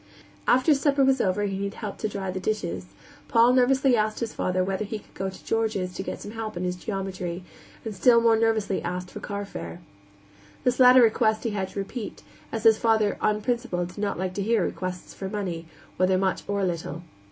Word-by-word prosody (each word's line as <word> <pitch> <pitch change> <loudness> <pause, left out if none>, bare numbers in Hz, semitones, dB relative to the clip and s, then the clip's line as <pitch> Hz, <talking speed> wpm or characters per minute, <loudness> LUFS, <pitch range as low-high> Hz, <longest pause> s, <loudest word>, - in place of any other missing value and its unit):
After 255 +5 +5
supper 280 -1 +3
was 265 -1 +3
over 195 +2 +1
and 200 - -1
he 195 +1 -3
had 200 - -5
helped 210 -3 -6
to 215 - -1
dry 195 -2 -4
the 190 - -4
dishes, 95 - -2 0.4
Paul 235 +2 +5
nervously 260 +1 +4
asked 215 -1 0
his 230 -2 -3
father 185 0 0
whether 190 +2 -1
he 215 +1 -4
could 210 - -18
go 190 0 -3
to 190 - -13
George's 215 -5 -1
to - - -4
get - - -5
some 205 - -8
help 220 -3 -5
in 175 - -3
his 180 0 -1
geometry, 185 -2 -4 0.4
and 220 - -3
still 235 +4 +5
more 230 -1 +4
nervously 220 -3 +1
asked 180 +1 -4
for - - -7
carfare. 200 -3 -6 0.8
This 250 0 +1
latter 250 0 +8
request 220 -1 +2
he 230 - -1
had 195 -2 -2
to - - -6
repeat, 205 +3 -6 0.3
as 225 -1 -3
his 225 -1 +6
father, 220 -3 +2
on 215 0 +1
principle, 235 -6 -1
did 180 +3 -10
not 205 -1 -1
like 185 0 -2
to 200 - -3
hear 215 -1 +2
requests 185 -1 -5
for 195 - -5
money, 180 -5 -4 0.3
whether 185 0 +3
much 190 0 0
or 200 -1 0
little. 170 -1 -4
205 Hz, 210 wpm, -26 LUFS, 185-225 Hz, 0.8 s, latter